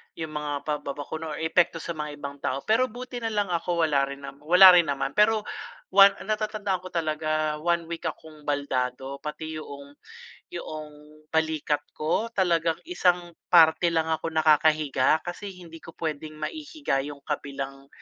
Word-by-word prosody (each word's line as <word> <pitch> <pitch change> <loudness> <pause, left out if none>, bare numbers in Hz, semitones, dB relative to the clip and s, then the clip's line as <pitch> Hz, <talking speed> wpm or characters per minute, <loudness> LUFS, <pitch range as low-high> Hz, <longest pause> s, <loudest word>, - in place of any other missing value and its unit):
yung 160 -2 -5
mga 145 -1 -4
pababakuna 150 +1 -4
or - - -8
epekto 165 0 +2
sa 170 - -4
mga 150 -2 -5
ibang 140 -1 -8
tao. 135 +1 -2
Pero 230 +4 +3
buti 245 +1 -7
na 225 - -2
lang 205 -4 -1
ako 170 0 0
wala 140 -3 +2
rin 140 0 -8
nam 140 - -9
wala 180 +5 +9
rin 175 -3 +5
naman. 135 -1 -1
Pero 215 +4 +3 0.5
1 195 +1 +8
natatandaan 215 -2 -1
ko 185 - -9
talaga, 155 -2 -1
1 170 +1 +1
week 170 - -3
akong 155 -2 -9
baldado. 135 -1 -2
Pati 150 +1 -6
yoong 140 -1 -10 0.6
yoong 150 0 -9
balikat 155 -2 0 0.2
ko 165 +9 0
talagang 170 -4 +2
isang 180 - +1 0.2
parte 165 0 +6
lang 160 -1 0
ako 160 - -2
nakakahiga 155 -2 +3
kasi 175 +3 -6
hindi 165 -2 -12
ko 165 - -13
puwedeng 155 -1 -4
maihiga 290 - -3
yung 140 0 -8
kabilang 140 -2 -5
160 Hz, 155 wpm, -26 LUFS, 145-175 Hz, 0.6 s, wala